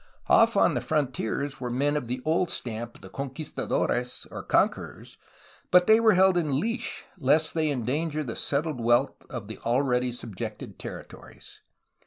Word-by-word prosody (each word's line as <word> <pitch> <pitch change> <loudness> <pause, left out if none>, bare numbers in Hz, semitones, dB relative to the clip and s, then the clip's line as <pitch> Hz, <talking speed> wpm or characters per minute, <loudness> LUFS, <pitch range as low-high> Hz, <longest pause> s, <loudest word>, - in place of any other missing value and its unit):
Off - - +5
on - - +4
the - - -1
frontiers 140 -1 -2
were 125 - -3
men 140 +4 +1
of 140 -5 -2
the 125 +1 -4
old 165 +3 +1
stamp 115 0 -4
of - - -16
the 95 - -10
con 140 +6 -4
quistadores, 125 -3 -2
or - - -6
conquerors, - - -1 0.5
but 180 0 +6
they 220 +3 +6
were 225 -3 +5
held 190 0 +5
in 150 -5 +1
leash 230 - -3
lest 155 +4 +3
they 160 -2 +1
endanger 145 +4 -1
the 120 -5 -5
settled 145 -2 -1
wealth 120 +4 +2
of 120 -7 -6
the 110 - -8
already 125 0 +1
subjected 115 -5 -7
territories. - - -10
140 Hz, 165 wpm, -27 LUFS, 125-160 Hz, 0.5 s, but